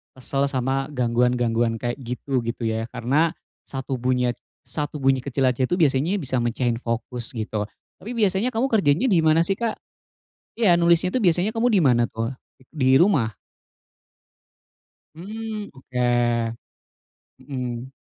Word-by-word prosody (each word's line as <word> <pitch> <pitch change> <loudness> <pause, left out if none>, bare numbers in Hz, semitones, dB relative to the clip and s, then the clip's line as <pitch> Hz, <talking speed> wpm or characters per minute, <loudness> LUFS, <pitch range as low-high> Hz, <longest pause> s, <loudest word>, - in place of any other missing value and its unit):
kesel 135 +2 -1
sama 135 0 -1
gangguan-gangguan 120 -2 +1
kayak 120 0 -2
gitu, 125 +1 -3
gitu 115 +1 -4
ya. 110 0 -1
Karena, 150 +7 +1 0.3
1 135 0 -4
bunyi- 125 0 0 0.3
1 150 0 -4
bunyi 135 -2 +2
kecil 135 0 -1
aja 125 0 +1
itu, 180 - +1
biasanya 155 +4 +2
bisa 130 -7 0
mecahin 120 0 0
fokus, 115 0 -3
gitu. 110 -2 -3 0.3
Tapi 220 - -7
biasanya 205 +3 +2
kamu 240 +2 0
kerjanya 200 - +2
di 180 -7 +4
mana 160 +1 +4
sih, 195 - +2
Kak? 230 +2 -2 0.8
Iya, 210 -7 +4
nulisnya 170 +1 +4
itu, 255 - +1
biasanya 180 +2 +2
kamu 230 +2 +2
di - - +5
mana 120 -3 +3
tuh? 115 +3 -3 0.4
Di 130 -4 +3
rumah? 140 - +3 1.8
Mhm. 215 +3 -6
Oke. 120 -3 0 0.9
Mhm. 130 -2 -5
130 Hz, 135 wpm, -23 LUFS, 120-170 Hz, 1.8 s, di